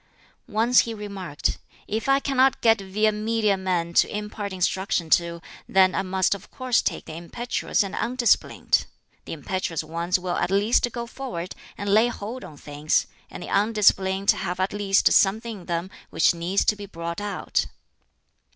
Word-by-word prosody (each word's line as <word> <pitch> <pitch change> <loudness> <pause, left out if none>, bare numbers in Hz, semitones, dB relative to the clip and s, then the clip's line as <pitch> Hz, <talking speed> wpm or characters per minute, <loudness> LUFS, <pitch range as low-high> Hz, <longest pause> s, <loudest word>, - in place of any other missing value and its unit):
Once 230 +3 +3
he 230 -1 0
remarked, 195 -8 -4 0.3
"If 220 +5 -2
I 275 0 +5
cannot 270 -1 +2
get 225 -2 +4
via 210 +3 +1
media 215 -1 +1
men 180 -3 -2
to - - +4
impart 210 -1 -5
instruction 185 -2 -1
to, 170 -1 +2 0.3
then 190 -1 +4
I - - 0
must 190 0 +1
of 200 - -9
course 255 -2 +1
take - - -3
the - - -8
impetuous 210 +8 -2
and 195 0 -6
undisciplined! 240 -1 +1 0.4
The - - -6
impetuous 165 +1 -3
ones 170 +3 -1
will 180 -1 -3
at - - 0
least 210 +5 +2
go 235 +1 -4
forward 235 -8 -6 0.2
and 205 - -5
lay 215 +4 +5
hold 240 +2 -6
on 150 - -11
things; 145 +2 0 0.2
and - - -8
the - - -8
undisciplined 200 -2 +3
have 180 -1 -4
at 190 +1 0
least 200 -1 +3
something 215 +2 +2
in 175 - -14
them 170 +2 -2 0.2
which - - +3
needs 175 +4 0
to 210 - +3
be 205 -1 -9
brought 170 0 -5
out." 205 -1 -1
195 Hz, 170 wpm, -24 LUFS, 180-220 Hz, 0.4 s, I